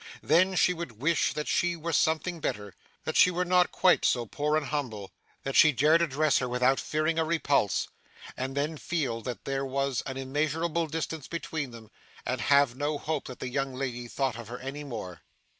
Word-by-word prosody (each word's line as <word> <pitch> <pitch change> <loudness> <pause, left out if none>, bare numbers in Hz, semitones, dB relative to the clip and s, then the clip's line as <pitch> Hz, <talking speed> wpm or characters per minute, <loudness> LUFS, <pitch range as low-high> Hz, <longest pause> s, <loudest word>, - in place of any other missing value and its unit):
Then 185 +5 +4
she 180 - +4
would 160 -11 -7
wish 160 +5 +2
that 150 - -4
she 175 0 +1
were 165 0 -4
something 160 +3 +1
better, 105 - -3 0.3
that - - -3
she - - +7
were 180 0 -1
not 180 0 +3
quite 185 -1 +4
so 120 -1 +2
poor 150 +6 0
and 155 - -1
humble, 125 -9 -4 0.3
that 135 - -3
she 155 - +7
dared 150 +5 +4
address 155 -1 +2
her 125 - -2
without 125 +2 +2
fearing 155 +2 0
a - - +3
repulse; 155 - +1 0.5
and 130 +2 -4
then 150 +2 -1
feel 140 -9 -2
that 125 +1 -6
there 135 0 -1
was 135 -2 -1
an 135 0 -5
immeasurable 155 +5 -1
distance 160 -2 -4
between 160 -4 -4
them, 115 -2 -13 0.3
and 125 -1 -2
have 140 0 +4
no 145 +2 -1
hope 155 0 -3
that 130 - -8
the 130 - -4
young 135 0 -2
lady 125 -2 -4
thought 130 -2 -2
of 115 - -8
her 120 +2 -6
any 135 +3 -6
more. 95 - -7
145 Hz, 195 wpm, -28 LUFS, 125-160 Hz, 0.5 s, she